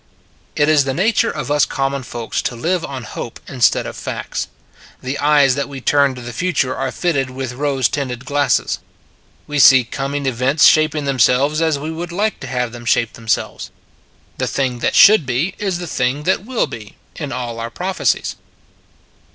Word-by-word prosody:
It 150 - +2
is 150 -3 +4
the 135 -1 -2
nature 210 +7 +2
of 140 - -4
us 145 -1 +3
common 135 0 -1
folks 120 -3 -4
to 120 - -3
live 170 +8 -1
on 130 -3 -6
hope 115 +1 -7
instead 125 -3 +2
of - - -6
facts. - - -4 0.5
The 130 +2 -4
eyes 145 -2 +4
that 140 +2 -3
we 140 -1 -7
turn 140 0 +2
to 125 - -9
the 120 0 -7
future 140 -3 0
are 135 0 -2
fitted 140 -7 -1
with 130 -1 -5
rose 135 -2 0
tinted 130 -3 -4
glasses. 145 -3 +1 0.7
We 150 -1 -2
see 130 -2 +8
coming 140 +4 -4
events 130 +4 +2
shaping 155 -1 +4
themselves 140 +3 +2
as 160 -3 +2
we 155 +3 -5
would 170 +2 -6
like 210 +5 -1
to 140 - -7
have 125 -2 -2
them 120 0 -10
shape 115 -1 +1
themselves. 115 -1 -2 0.7
The - - 0
thing 130 -3 -1
that - - 0
should 215 -5 +7
be 135 +10 0
is 195 -4 -1
the 175 - -6
thing 135 -1 -1
that 190 +4 0
will 255 -2 0
be, 105 -2 -10 0.2
in 145 -4 -5
all 120 -2 -4
our 115 0 -4
prophecies. 185 +10 -1
140 Hz, 185 wpm, -18 LUFS, 125-155 Hz, 0.7 s, see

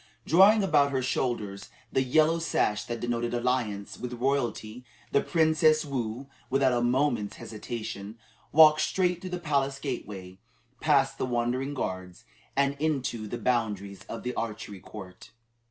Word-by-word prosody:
Drawing 195 +6 +6
about 150 -6 +4
her 130 -2 -1
shoulders 115 -6 -2 0.2
the 130 - +3
yellow 155 +5 +3
sash 105 -9 0
that 120 -1 -4
denoted 120 0 -2
alliance 120 -5 -2
with 125 0 -5
royalty, 125 -2 -2 0.3
the 140 - +3
Princess 155 -1 +3
Woo, 125 -2 -3 0.2
without 135 -1 +3
a 120 - +1
moment's 120 -3 +1
hesitation, 110 -2 -7 0.3
walked 155 0 +7
straight 180 -2 +1
through 185 - -6
the 180 - -3
palace 140 -5 0
gateway, 100 -9 -6 0.4
past 140 -3 +2
the - - 0
wondering 125 +3 -1
guards, 95 -6 -5 0.3
and 140 0 +2
into 130 -8 -1
the 120 - -4
boundaries 105 -5 -1
of 115 - -7
the 125 - -2
archery 105 -3 -5
court. 95 -2 -11
125 Hz, 140 wpm, -28 LUFS, 110-145 Hz, 0.4 s, walked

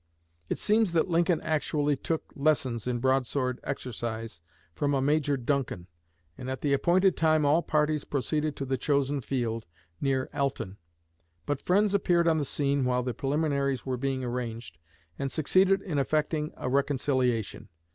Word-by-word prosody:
It - - -1
seems 215 -3 +2
that 170 +2 +1
Lincoln 170 0 +3
actually 150 -2 0
took 160 +4 -4
lessons 135 -6 +1
in 125 -1 0
broadsword 130 0 0
exercise 115 -7 -5 0.3
from 145 - 0
a - - +2
Major 145 +1 +2
Duncan; 130 -8 -2 0.5
and 130 - -5
at 130 -1 -4
the 145 -2 +1
appointed 180 +6 +3
time 155 -2 +3
all 150 +4 +4
parties 150 -2 +1
proceeded 150 +2 -1
to 135 - -4
the 130 -1 -1
chosen 140 0 +1
field, 115 -5 -2 0.3
near 135 -2 +1
Alton. 135 -9 -2 0.7
But 145 +5 -2
friends 205 +2 +2
appeared 175 -3 +3
on 160 -1 +3
the 145 - -1
scene 140 0 0
while 125 0 +1
the 125 -1 -2
preliminaries 140 -1 0
were 130 -1 -1
being 130 +1 -2
arranged, 120 -5 -5 0.4
and 135 -1 -2
succeeded 190 +5 +3
in 155 -7 -1
effecting 150 +2 0
a - - -4
reconciliation. 130 -4 0
140 Hz, 155 wpm, -28 LUFS, 125-155 Hz, 0.7 s, all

